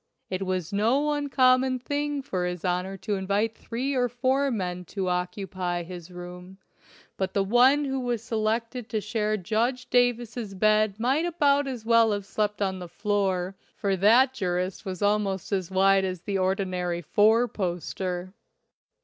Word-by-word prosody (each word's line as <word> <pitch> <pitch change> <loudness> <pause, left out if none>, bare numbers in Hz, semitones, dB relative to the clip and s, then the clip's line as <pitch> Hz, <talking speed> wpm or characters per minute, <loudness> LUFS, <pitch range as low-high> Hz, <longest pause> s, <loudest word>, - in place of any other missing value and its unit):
It 190 0 -2
was 185 -1 -2
no 250 +9 +2
uncommon 260 -3 +3
thing 285 +2 -2
for 185 -8 -2
his 180 0 -5
Honor 180 +2 -1
to 205 - -3
invite 200 +3 0
three 255 +4 -3
or 250 -2 +1
four 260 +3 +1
men 180 -6 -3
to 190 +1 -3
occupy 180 -1 -2
his 175 -1 -9
room, 180 +1 -10 0.6
but 190 -1 -2
the 200 - +3
one 255 +8 +4
who 270 -1 -2
was 240 -3 -2
selected 230 +1 -2
to 220 - -1
share 215 0 -1
Judge 230 +6 -1
Davis's 240 -4 +1
bed 215 +1 +2
might 265 +8 +1
about 285 -4 +2
as 245 -4 -5
well 230 -1 +4
have 200 -1 -3
slept 210 0 -1
on 190 -1 -2
the 180 - -7
floor, 195 -2 -1 0.2
for 200 -2 0
that 235 +8 +5
jurist 185 -3 -2
was 185 0 -4
al 205 +1 +4
most 195 -2 -3
as 190 -3 -1
wide 195 0 +4
as 185 -2 -3
the 195 0 -2
ordinary 185 -2 -1
four 220 +8 +4
poster. 180 -1 -4
205 Hz, 160 wpm, -26 LUFS, 185-245 Hz, 0.6 s, that